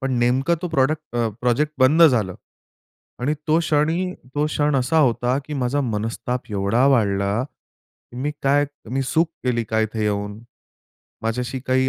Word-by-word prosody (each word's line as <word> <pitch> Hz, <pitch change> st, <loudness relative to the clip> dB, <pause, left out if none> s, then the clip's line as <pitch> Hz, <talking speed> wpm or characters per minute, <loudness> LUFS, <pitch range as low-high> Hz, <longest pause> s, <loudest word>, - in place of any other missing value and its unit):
पण 135 Hz, -1 st, -2 dB
नेमकं 130 Hz, +7 st, +2 dB
तो 180 Hz, -, -2 dB
प्रॉडक्ट 155 Hz, -2 st, 0 dB
अ, 115 Hz, -1 st, +1 dB
प्रोजेक्ट 125 Hz, +5 st, +1 dB
बंद 145 Hz, +6 st, +5 dB
झालं 110 Hz, -9 st, 0 dB, 0.9 s
आणि 140 Hz, +5 st, 0 dB
तो 155 Hz, +1 st, +3 dB
क्षणी 165 Hz, +3 st, +1 dB, 0.2 s
तो 150 Hz, +1 st, +1 dB
क्षण 150 Hz, -1 st, +1 dB
असा 130 Hz, +5 st, +2 dB
होता, 125 Hz, -2 st, +2 dB
की 150 Hz, -, -5 dB
माझा 130 Hz, +4 st, 0 dB
मनस्ताप 115 Hz, +1 st, -3 dB
एवढा 100 Hz, +6 st, +2 dB
वाढला, 100 Hz, -3 st, +1 dB
की 125 Hz, -3 st, -21 dB
मी 145 Hz, -, 0 dB
काय, 145 Hz, +1 st, +3 dB, 0.2 s
मी 135 Hz, +2 st, 0 dB
चूक 160 Hz, +5 st, +1 dB, 0.2 s
केली 120 Hz, -2 st, 0 dB
का 110 Hz, 0 st, 0 dB
इथे 110 Hz, 0 st, -1 dB
येऊन? 105 Hz, 0 st, -2 dB, 0.8 s
माझ्याशी 120 Hz, +3 st, -2 dB
काही 130 Hz, 0 st, +2 dB
130 Hz, 155 wpm, -22 LUFS, 115-150 Hz, 0.9 s, बंद